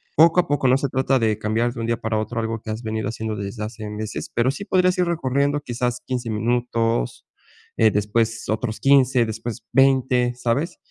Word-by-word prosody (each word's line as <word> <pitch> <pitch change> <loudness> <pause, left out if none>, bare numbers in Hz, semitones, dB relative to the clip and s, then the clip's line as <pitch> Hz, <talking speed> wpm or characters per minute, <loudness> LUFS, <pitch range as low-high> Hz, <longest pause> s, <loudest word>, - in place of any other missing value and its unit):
Poco 165 +3 +6
a - - -11
poco, 145 -2 +1
no 130 +1 +5
se 140 0 -2
trata 130 +1 +1
de 110 -3 +1
cambiar 110 +3 0
de - - -8
un - - -2
día 115 - +1
para 110 -1 -1
otro 115 +2 -3
algo 115 0 -3
que 110 - -6
has 110 +2 -5
venido 110 -1 -3
haciendo 110 -1 -4
desde 100 +2 -5
hace 110 -1 -6
meses, 105 0 -5
pero 120 +2 +2
sí 200 +8 -7
podrías 185 -2 +2
ir 180 - +3
recorriendo 145 -3 0
quizás 125 -2 -2
15 125 -2 -3
minutos, 115 - -1 0.5
eh, 110 - +5
después 115 +3 -1
otros 110 +1 -2
15 130 -3 +4
después 110 0 -6
20 130 -2 +3
¿sabes?, 125 +7 -1
120 Hz, 200 wpm, -22 LUFS, 110-135 Hz, 0.5 s, Poco